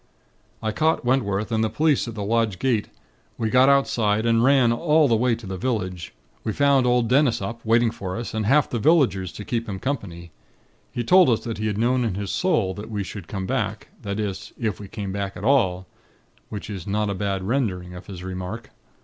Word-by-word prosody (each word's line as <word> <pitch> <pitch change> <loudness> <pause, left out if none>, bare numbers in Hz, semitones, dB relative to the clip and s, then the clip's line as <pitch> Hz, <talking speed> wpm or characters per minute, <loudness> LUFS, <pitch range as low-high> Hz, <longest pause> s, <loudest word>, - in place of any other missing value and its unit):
"I 110 - 0
caught 160 +3 +1
Wentworth 110 -4 0
and 110 0 +1
the 110 - +1
police 150 -2 +1
at 115 - -6
the 105 - -4
lodge 110 -2 +1
gate. 115 0 0 0.5
We 110 -1 -1
got 130 +1 +6
outside, 115 -6 +2
and 115 0 +3
ran 130 -3 +5
all 155 +3 +3
the 115 - +3
way 120 +1 +2
to 115 -1 -11
the 95 -1 -5
village. 95 -7 -3 0.3
We 110 - -2
found 140 -1 +3
old 120 -1 +3
Dennis 130 0 +3
up, 115 +4 -6
waiting 115 +1 +3
for 95 -4 -5
us, 115 - -5
and 110 -2 -1
half 140 +4 +4
the 120 - -3
villagers 110 - +3
to 105 - -8
keep 115 -1 -2
him 95 - -3
company. 95 - -5 0.6
He 120 - -3
told 180 +4 +6
us 115 - +2
that 115 -3 -5
he 110 - -1
had 105 -1 -2
known 125 +3 +2
in 110 -6 -1
his 100 0 -3
'sowl' 115 - +1
that 105 +2 -7
we 105 -2 -2
should 95 -2 -8
come 95 0 -4
back, 110 -4 -2
that 100 -1 -4
is, 100 -3 -4
if 110 -4 -2
we 100 - -8
came 100 -2 -5
back 100 -1 -4
at 95 - -8
all; 95 -9 +2 0.6
which 105 - -6
is 100 -4 -7
not 105 +1 0
a - - -1
bad 95 -1 -2
rendering 95 -6 -1
of 90 +2 -10
his 90 -3 -8
remark. 95 +4 -6
110 Hz, 220 wpm, -23 LUFS, 100-125 Hz, 0.6 s, got